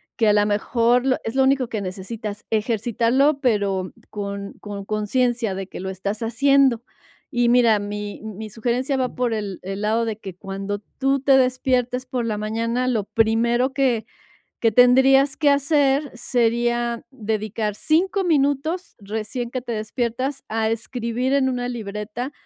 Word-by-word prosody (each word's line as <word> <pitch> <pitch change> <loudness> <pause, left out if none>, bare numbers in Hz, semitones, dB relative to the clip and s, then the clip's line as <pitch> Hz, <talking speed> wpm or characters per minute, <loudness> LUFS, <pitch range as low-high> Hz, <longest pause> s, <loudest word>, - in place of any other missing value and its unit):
que 225 -2 +3
a - - +5
la 205 0 +4
mejor 240 +5 +2
es 225 - -3
lo 265 - +4
único 265 -1 +2
que 220 -2 -3
necesitas, 205 +3 -6
ejercitarlo, 235 +6 +1
pero 200 -7 0 0.2
con 200 -1 -5
con 200 -1 -7
consciencia 225 +1 0
de 190 0 -5
que - - -9
lo 190 +1 -4
estás 200 +3 -4
haciendo. 260 +1 +3 0.5
Y 240 -4 +1
mira, 235 -3 +5
mi 205 0 -5
mi 215 0 -7
sugerencia 245 +5 -1
va 255 -1 -1
por 245 -2 0
el 205 -3 -4
el 195 +2 -5
lado 220 +2 +1
de 220 -2 -3
que 190 -4 -9
cuando 195 +2 -5 0.2
tú 275 0 +2
te 270 0 +5
despiertes 255 -1 +1
por 255 -2 -2
la 215 -2 -1
mañana, 230 +4 -1
lo 225 -5 0
primero 235 +4 +2
que 255 -5 +1 0.6
que 225 -1 +3
tendrías 265 +4 +5
que 300 -2 +3
hacer 280 0 +2
sería 240 -1 0
dedicar 215 -3 -2
5 365 - +1
minutos 310 +2 0
recién 220 +4 -4
que 255 - -3
te 245 -1 -6
despiertas 240 +5 -2
a 220 0 0
escribir 235 +3 -2
en 265 -2 +3
una 245 -1 -2
libreta 220 +2 -5
235 Hz, 155 wpm, -22 LUFS, 210-260 Hz, 0.6 s, a